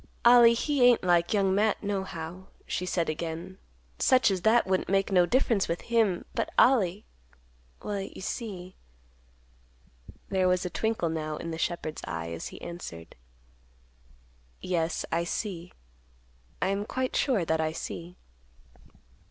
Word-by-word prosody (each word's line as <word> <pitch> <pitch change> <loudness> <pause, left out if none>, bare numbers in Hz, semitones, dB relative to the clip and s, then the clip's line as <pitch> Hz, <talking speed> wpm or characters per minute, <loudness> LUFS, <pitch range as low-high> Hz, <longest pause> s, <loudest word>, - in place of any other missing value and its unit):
"Ollie 235 -1 +8
he 285 +3 0
ain't 245 -1 +5
like 175 -1 +2
Young 195 -3 +2
Matt, 210 +2 +1
nohow," 190 -3 -4 0.2
she 180 - -3
said 170 -2 0
again. 165 +4 -5 0.4
"Such 255 -5 +4
as 185 -2 -1
that 225 +4 +4
wouldn't 185 -1 0
make 195 +1 +1
no 180 -2 +4
difference 235 -4 +2
with 170 - -2
him. 215 -6 +2
But - - -1
Ollie—well 60 - -1
you 195 - -8
see—" 190 -3 -6 1.5
There 190 -1 +2
was 180 0 +1
a 180 - -3
twinkle, 220 -6 -1
now, 155 -1 -3
in 165 - -5
the 160 - -5
shepherd's 160 -2 -3
eye, 85 0 -5
as 85 - -5
he - - -10
answered; 85 - -8 1.4
"Yes, 170 -2 -1
I 170 +1 +1
see; 180 -1 -4 0.9
I 185 - +1
am 200 +1 -1
quite 260 0 -2
sure 230 - +1
that 160 0 +1
I 155 0 0
see." 170 +2 -7
185 Hz, 140 wpm, -28 LUFS, 165-205 Hz, 1.5 s, Ollie